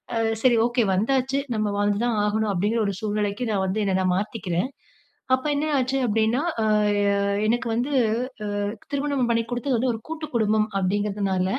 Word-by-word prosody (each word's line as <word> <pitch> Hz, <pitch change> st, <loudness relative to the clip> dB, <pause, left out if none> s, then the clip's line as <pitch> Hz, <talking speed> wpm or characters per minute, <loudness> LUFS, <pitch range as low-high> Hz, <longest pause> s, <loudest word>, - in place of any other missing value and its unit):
அ -, -, +1 dB, 0.3 s
சரி, 245 Hz, -2 st, +5 dB
ஓகே 240 Hz, -1 st, +1 dB
வந்தாச்சு. 265 Hz, +6 st, +1 dB, 0.2 s
நம்ம 215 Hz, -1 st, 0 dB
வாழ்ந்து 205 Hz, 0 st, +1 dB
தான் 230 Hz, -3 st, 0 dB
ஆகணும் 215 Hz, 0 st, 0 dB
அப்பிடீங்கிற 210 Hz, +5 st, 0 dB
ஒரு 200 Hz, -, -1 dB
சூழ்நிலைக்கு 210 Hz, +1 st, -1 dB
நான் 190 Hz, -2 st, 0 dB
வந்து 210 Hz, +3 st, -1 dB
என்ன 190 Hz, -1 st, +1 dB
நான் 180 Hz, -1 st, +2 dB
மாத்திக்கிறேன். 200 Hz, 0 st, -2 dB, 0.6 s
அப்போ, 260 Hz, +3 st, +1 dB
என்ன 295 Hz, +2 st, 0 dB
ஆச்சு 260 Hz, +1 st, 0 dB
அப்பிடீன்னா, 225 Hz, +3 st, +1 dB, 0.2 s
அ, -, -, +1 dB, 0.5 s
அ -, -, +1 dB, 0.3 s
எனக்கு 240 Hz, +2 st, 0 dB
வந்து 255 Hz, +5 st, -1 dB, 0.7 s
அ -, -, 0 dB, 0.3 s
திருமணம் 280 Hz, -3 st, 0 dB
பண்ணி 230 Hz, 0 st, +2 dB
குடுத்தது 245 Hz, +2 st, 0 dB
வந்து 255 Hz, +2 st, +1 dB
ஒரு 220 Hz, -, -5 dB
கூட்டு 320 Hz, -1 st, -4 dB
குடும்பம் 215 Hz, -1 st, +2 dB
அப்பிடீங்கிறதுனால, 195 Hz, -1 st, 0 dB
220 Hz, 170 wpm, -24 LUFS, 205-250 Hz, 0.7 s, சரி